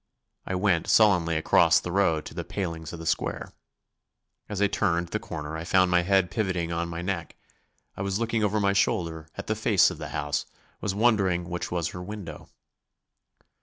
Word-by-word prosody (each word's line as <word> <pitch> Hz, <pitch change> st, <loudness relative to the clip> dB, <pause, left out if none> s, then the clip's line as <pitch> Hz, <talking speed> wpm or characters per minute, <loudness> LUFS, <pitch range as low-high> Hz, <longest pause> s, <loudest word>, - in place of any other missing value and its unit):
I 95 Hz, -, -1 dB
went 90 Hz, -3 st, +1 dB
sullenly 90 Hz, -7 st, +4 dB
across 80 Hz, -, +4 dB
the 90 Hz, -, -6 dB
road 85 Hz, -5 st, +2 dB
to -, -, -8 dB
the 85 Hz, +1 st, -4 dB
palings 85 Hz, -3 st, -4 dB
of 85 Hz, -, -7 dB
the 80 Hz, -, -8 dB
square. 85 Hz, -, -2 dB, 1.0 s
As 105 Hz, -2 st, -4 dB
I 100 Hz, -, +4 dB
turned 85 Hz, -4 st, 0 dB
the -, -, -2 dB
corner 75 Hz, 0 st, -6 dB
I 80 Hz, -, -4 dB
found 95 Hz, +1 st, +3 dB
my 90 Hz, 0 st, +4 dB
head 95 Hz, 0 st, +2 dB
pivoting 90 Hz, -6 st, -1 dB
on 85 Hz, 0 st, -2 dB
my 85 Hz, +1 st, -5 dB
neck. 90 Hz, -3 st, -3 dB, 0.6 s
I -, -, -6 dB
was 95 Hz, 0 st, -1 dB
looking 115 Hz, -1 st, 0 dB
over 105 Hz, +1 st, +1 dB
my 100 Hz, -1 st, +2 dB
shoulder 80 Hz, -4 st, 0 dB
at -, -, -6 dB
the -, -, -1 dB
face -, -, +4 dB
of -, -, -9 dB
the -, -, -6 dB
house, 75 Hz, 0 st, -2 dB, 0.3 s
was 100 Hz, -2 st, -2 dB
wondering 100 Hz, -6 st, +2 dB
which 90 Hz, 0 st, -4 dB
was 85 Hz, -2 st, -1 dB
her 90 Hz, -, -7 dB
window. 90 Hz, -5 st, -8 dB
90 Hz, 190 wpm, -26 LUFS, 85-100 Hz, 1.0 s, sullenly